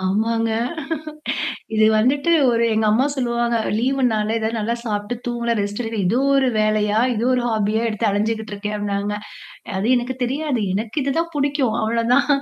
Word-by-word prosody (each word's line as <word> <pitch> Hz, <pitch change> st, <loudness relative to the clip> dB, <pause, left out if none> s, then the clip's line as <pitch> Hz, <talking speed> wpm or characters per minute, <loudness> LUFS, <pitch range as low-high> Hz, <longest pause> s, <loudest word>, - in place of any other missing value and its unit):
ஆமாங்க. 225 Hz, +4 st, 0 dB, 1.3 s
இது 215 Hz, 0 st, +5 dB
வந்துட்டு 280 Hz, +8 st, +2 dB, 0.2 s
ஒரு 235 Hz, -1 st, +2 dB
எங்க 220 Hz, 0 st, +1 dB
அம்மா 240 Hz, +5 st, +3 dB
சொல்லுவாங்க 235 Hz, -2 st, 0 dB, 0.2 s
"லீவு்னால 230 Hz, -3 st, +1 dB
ஏதாவது 225 Hz, +1 st, -2 dB
நல்லா 225 Hz, +2 st, -1 dB
சாப்பிட்டு 210 Hz, 0 st, -2 dB
தூங்கலாம், 235 Hz, -1 st, -1 dB
ரெஸ்ட்டேடுக்கலாம் 205 Hz, +1 st, -3 dB
இது 220 Hz, +7 st, +2 dB, 0.2 s
ஒரு 270 Hz, -1 st, +3 dB
வேலையா? 215 Hz, 0 st, +2 dB
இதோ 230 Hz, +1 st, -1 dB
ஒரு 250 Hz, -, +1 dB
ஹாபியா 220 Hz, -1 st, 0 dB
எடுத்து 215 Hz, +1 st, -2 dB
அலஞ்சுகிட்டிருக்கே 210 Hz, 0 st, -2 dB
அப்னாங்க." 205 Hz, 0 st, -2 dB, 0.6 s
அது 195 Hz, +3 st, -1 dB
எனக்கு 245 Hz, +2 st, -2 dB
தெரியாது. 270 Hz, -1 st, -1 dB
எனக்கு 215 Hz, +5 st, -3 dB
இதுதான் 325 Hz, +5 st, -1 dB
புடிக்கும் 280 Hz, -5 st, 0 dB
அவ்ளோதான். 235 Hz, +5 st, +2 dB
225 Hz, 140 wpm, -21 LUFS, 210-245 Hz, 1.3 s, இது